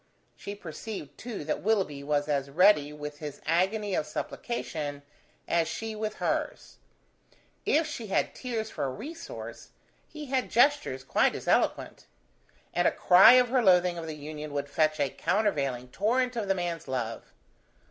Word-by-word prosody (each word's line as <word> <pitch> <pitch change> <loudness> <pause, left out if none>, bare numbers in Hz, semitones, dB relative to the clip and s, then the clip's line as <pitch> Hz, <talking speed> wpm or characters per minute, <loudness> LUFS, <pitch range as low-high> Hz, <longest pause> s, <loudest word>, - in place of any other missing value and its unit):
She 200 - -7
perceived 175 -2 -8
too 230 -8 -6
that 155 - -2
Willoughby 195 -9 0
was 145 0 0
as 140 -2 -1
ready 150 -2 +4
with 150 0 -7
his 150 -2 -7
agony 195 +4 +1
of 155 - 0
supplication 150 - -4 0.4
as 170 -1 +2
she 225 +4 -4
with 215 0 -3
hers. - - -3 0.9
If 315 +2 +3
she 245 -7 -6
had 195 - 0
tears 230 -4 -4
for - - -3
a - - -1
resource, 320 - -8 0.4
he 305 -1 -8
had 260 -1 -1
gestures 250 - +2
quite - - +2
as - - -7
eloquent; - - 0 0.7
and - - +3
a - - +4
cry 190 +6 +7
of 250 -1 +5
her 255 0 +3
loathing 180 -4 +4
of 165 - -6
the 155 - -5
union 150 0 -7
would 145 0 -3
fetch 155 -2 +2
a 140 - +2
countervailing 140 - 0
torrent 250 - 0
of 220 -4 -2
the 195 - +2
man's 175 -3 -3
love. 120 -4 -4
175 Hz, 160 wpm, -28 LUFS, 150-220 Hz, 0.9 s, cry